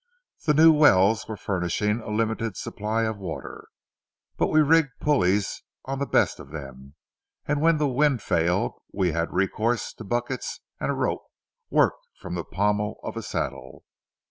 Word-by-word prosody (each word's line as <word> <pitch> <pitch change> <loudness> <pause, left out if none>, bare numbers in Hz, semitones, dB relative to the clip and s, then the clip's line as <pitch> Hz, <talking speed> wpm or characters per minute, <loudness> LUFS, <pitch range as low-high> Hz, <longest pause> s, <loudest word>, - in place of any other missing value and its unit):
The 150 - +4
new 160 +2 +8
wells 110 -8 +4
were 110 - -5
furnishing 100 +4 -1
a 110 - -8
limited 110 -1 -1
supply 110 +2 -2
of 110 -2 -2
water, 90 -5 -7 0.7
but - - +1
we 155 - +3
rigged 150 -2 +3
pulleys 105 -9 +1 0.2
on 135 0 -3
the 140 - -1
best - - +2
of 70 - -11
them, 70 -2 -9 0.5
and 145 0 0
when 165 0 +4
the 150 -1 +1
wind 135 -2 +2
failed 85 +3 +1 0.2
we 95 -3 0
had 85 +2 -1
recourse 110 +5 0
to - - -10
buckets 120 +4 -3 0.2
and - - -2
a - - 0
rope - - -2 0.4
worked - - +2
from 90 - -8
the 85 -1 -3
pommel 105 +4 -1
of - - -5
a - - -3
saddle. 65 - -5
110 Hz, 165 wpm, -25 LUFS, 95-135 Hz, 0.7 s, new